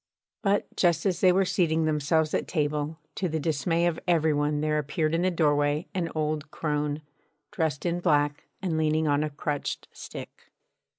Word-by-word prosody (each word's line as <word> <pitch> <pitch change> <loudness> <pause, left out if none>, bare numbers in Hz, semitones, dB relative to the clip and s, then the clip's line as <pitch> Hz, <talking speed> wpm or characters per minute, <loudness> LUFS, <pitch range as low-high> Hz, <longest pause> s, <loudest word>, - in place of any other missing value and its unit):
But 205 -2 0
just 170 -1 +2
as 185 -3 0
they 185 - +6
were 190 +1 +3
seating 160 -3 +1
themselves 155 +1 +1
at - - 0
table, 150 -1 -1 0.2
to 185 - -2
the 160 0 -1
dismay 165 +3 +1
of 170 -2 0
every 160 -3 +3
one 145 0 +1
there 150 0 +1
appeared 155 +2 -1
in 165 - +2
the 185 - +3
doorway 145 -2 +2
an 175 -4 -1
old 155 -1 -1
crone, 150 -1 -2 0.5
dressed 160 -8 -1
in 175 0 0
black 145 -3 +1 0.2
and 165 -4 0
leaning 155 0 +2
on 145 0 +2
a 155 - -1
crutched 145 0 -3
stick. - - -10
155 Hz, 175 wpm, -27 LUFS, 150-170 Hz, 0.5 s, they